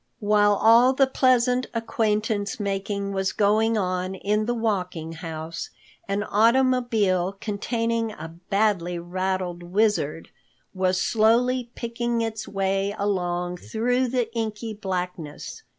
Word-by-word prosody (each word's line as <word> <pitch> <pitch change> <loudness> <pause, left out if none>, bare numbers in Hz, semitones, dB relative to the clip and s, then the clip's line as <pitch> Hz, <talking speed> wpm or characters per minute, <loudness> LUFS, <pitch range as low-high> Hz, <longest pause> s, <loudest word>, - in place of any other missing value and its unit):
While 205 -1 +3
all 230 +5 +6
the 270 +1 +4
pleasant 255 -1 +2
acquaintance 220 -1 -1
making 200 0 -2
was 190 0 0
going 220 +2 +2
on 185 -1 -1
in 210 +3 0
the 240 - +1
Walking 180 -8 -2
House, 165 0 -6 0.4
an 200 +1 -1
automobile 225 -5 +2
containing 230 +1 -1
a 165 -4 -9 0.2
badly 195 -4 +1
rattled 180 0 -3
Wizard 180 -4 0 0.4
was 185 -1 +1
slowly 235 +4 +2
picking 235 0 -2
its 220 -2 -3
way 195 +1 -1
along 180 -3 -1
through 245 +6 0
the 240 -2 -1
inky 225 -1 -3
blackness. 180 - -5
205 Hz, 115 wpm, -24 LUFS, 185-230 Hz, 0.4 s, all